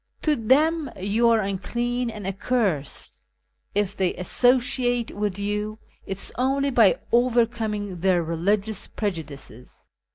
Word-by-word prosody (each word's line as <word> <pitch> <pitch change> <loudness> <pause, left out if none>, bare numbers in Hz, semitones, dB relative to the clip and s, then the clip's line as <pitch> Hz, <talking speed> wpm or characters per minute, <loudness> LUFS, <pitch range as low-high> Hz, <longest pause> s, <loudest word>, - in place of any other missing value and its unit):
To 305 -2 +3
them 295 +6 +2
you 215 +5 +2
are 225 -1 +4
unclean 240 +5 -2
and 210 -3 -7
accursed: 195 - -2 0.5
if 205 -1 0
they 185 -2 0
associate 245 +4 +1
with 205 -2 -2
you 210 +1 -2 0.3
it 195 - -3
is - - -4
only 275 +2 +1
by 225 -6 +5 0.2
overcominfij 230 -6 +1
their 180 -2 +3
religious 195 +6 0
prejudices. 155 - -6
210 Hz, 120 wpm, -24 LUFS, 195-245 Hz, 0.5 s, by